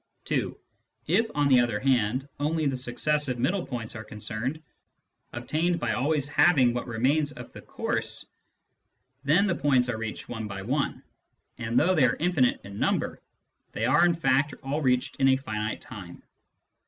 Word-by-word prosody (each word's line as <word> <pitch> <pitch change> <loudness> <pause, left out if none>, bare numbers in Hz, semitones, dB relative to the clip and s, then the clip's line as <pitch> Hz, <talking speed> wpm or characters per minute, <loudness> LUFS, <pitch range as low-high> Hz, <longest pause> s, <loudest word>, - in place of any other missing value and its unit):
(2) - - -1 0.5
If, 225 +7 +2
on 145 -1 +3
the 130 -3 +6
other 120 -4 +1
hand, 130 0 +1
only 155 +2 0
the 135 -2 +1
successive 130 +2 0
middle 175 +10 0
points 120 -4 -5
are 110 - -6
concerned, 110 +6 -4 0.7
obtained 170 +3 -1
by 120 -1 -1
always 145 +4 +1
halving 140 -5 +4
what 120 - -3
remains 140 +6 +1
of - - -10
the - - -10
course, - - -3 1.0
then 160 +8 +4
the 190 - +1
points 130 -6 +2
are 110 -2 -2
reached 110 -1 -5
one 110 -3 -5
by 100 -1 -6
one, 140 +7 -1 0.6
and, 115 +1 -1
though 180 +7 +4
they 155 -7 +4
are 125 - +2
infinite 160 -7 +2
in 100 0 -9
number, - - 0 0.5
they 110 - -1
are 150 +7 +4
in 175 -1 +4
fact 140 -3 +1
all 140 +3 -2
reached 125 -3 +1
in 135 - +3
a 130 - +5
finite 110 -5 -4
time. - - -10
130 Hz, 165 wpm, -27 LUFS, 120-150 Hz, 1.0 s, the